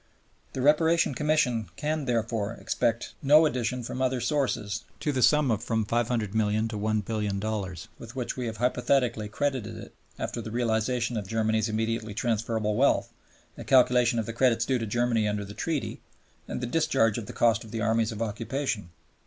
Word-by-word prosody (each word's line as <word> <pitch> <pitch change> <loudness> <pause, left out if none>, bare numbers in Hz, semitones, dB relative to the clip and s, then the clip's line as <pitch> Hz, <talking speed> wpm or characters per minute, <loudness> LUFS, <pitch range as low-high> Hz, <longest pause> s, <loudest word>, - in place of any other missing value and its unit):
The 130 - -2
Reparation 160 +2 +4
Commission 130 -6 +1
can, 155 -1 -2
therefore, 115 -3 -1
expect 115 0 -1
no 150 +3 +6
addition 125 -3 -1
from 125 +2 -5
other 130 -1 +1
sources 120 -8 -1 0.2
to 150 - 0
the 130 -2 -1
sum 140 +2 +4
of 110 0 -1
from 110 -2 0
$500,000,000 110 -2 0
to 110 - -5
$1,000,000,000 105 -3 -2
with 115 +2 -10
which 125 -2 -3
we 125 -2 -3
have 110 -1 -5
hypothetically 125 -2 +1
credited 130 -2 -2
it - - -10 0.2
after 120 - -4
the 110 - -6
realization 120 +1 0
of 100 -3 -4
Germany's 110 0 +1
immediately 110 -1 -2
transferable 110 -2 0
wealth, 135 +5 +2 0.4
the - - -8
calculation 125 -2 +4
of 115 - 0
the 115 - -5
credits 120 -1 +2
due 130 -2 +1
to 115 - -3
Germany 115 0 +1
under 105 -1 -2
the 100 - -9
Treaty, 155 +4 -3 0.5
and - - -4
the - - -1
discharge 120 -5 +2
of 105 - -8
the - - -6
cost 115 -2 +2
of 110 - -12
the 115 +1 -4
Armies 110 +1 +1
of 110 +1 -3
Occupation. 115 -1 -3
115 Hz, 175 wpm, -27 LUFS, 110-125 Hz, 0.5 s, no